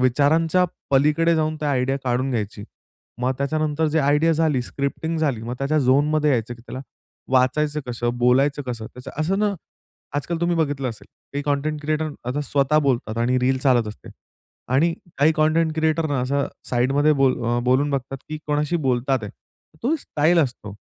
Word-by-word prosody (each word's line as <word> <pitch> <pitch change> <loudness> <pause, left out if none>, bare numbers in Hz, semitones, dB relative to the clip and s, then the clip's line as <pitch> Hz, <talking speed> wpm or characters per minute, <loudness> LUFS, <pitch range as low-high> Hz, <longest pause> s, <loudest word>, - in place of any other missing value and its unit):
विचारांच्या 155 +7 +3 0.3
पलीकडे 150 +5 +3
जाऊन 155 0 0
ती - - -3
आयडिया 135 -1 +1
काढून 130 +2 0
घ्यायची. 105 -3 -3 0.6
मग 125 +1 +1
त्याच्यानंतर 155 +2 0
जे 155 +2 +1
आयडिया 150 +3 +3
झाली 155 -5 +1
स्क्रिप्टिंग 140 +5 -3
झाली 135 -8 0
मग 120 +2 -4
त्याच्या 140 +3 +1
झोनमध्ये 145 +3 +3
यायचं 120 -2 0
की 115 - -17
त्याला 130 - -6 0.5
वाचायचं 150 +4 +2
कसं? 120 0 -1
बोलायचं 135 +4 +3
कसं? 115 -3 -4
त्याचं 125 +3 -10
असं 185 +5 0
ना 210 -1 +1 0.6
आजकाल 165 +4 -2
तुम्ही 170 0 +1
बघितलं 145 -4 0
असेल, 115 -3 -9 0.3
काही 145 0 -2
कंटेंट 145 +1 -1
क्रिएटर 155 +1 -1 0.2
आता 135 +4 -1
स्वतः 140 +2 +2
बोलतात 120 -5 -1
आणि 125 +2 +2
रील 130 +1 +1
चालत 125 -4 +3
असते 105 - -11 0.7
आणि 165 +5 +3 0.3
काही 150 +3 +5
कंटेंट 155 +1 +2
क्रिएटर 160 0 +1
ना 140 -3 0
असं, 140 +2 0 0.2
साइडमध्ये 135 +5 +3
बोल 135 -1 +4
अ, 120 +1 +1
बोलून 130 +4 +2
बघतात 135 -1 -3
की 155 0 -5
कोणाशी 150 +2 0
बोलतात. 130 +1 +1 0.6
तो 265 +7 +2
स्टाईल 170 - +1
असतो. 125 -9 -1
140 Hz, 165 wpm, -22 LUFS, 125-155 Hz, 0.7 s, काही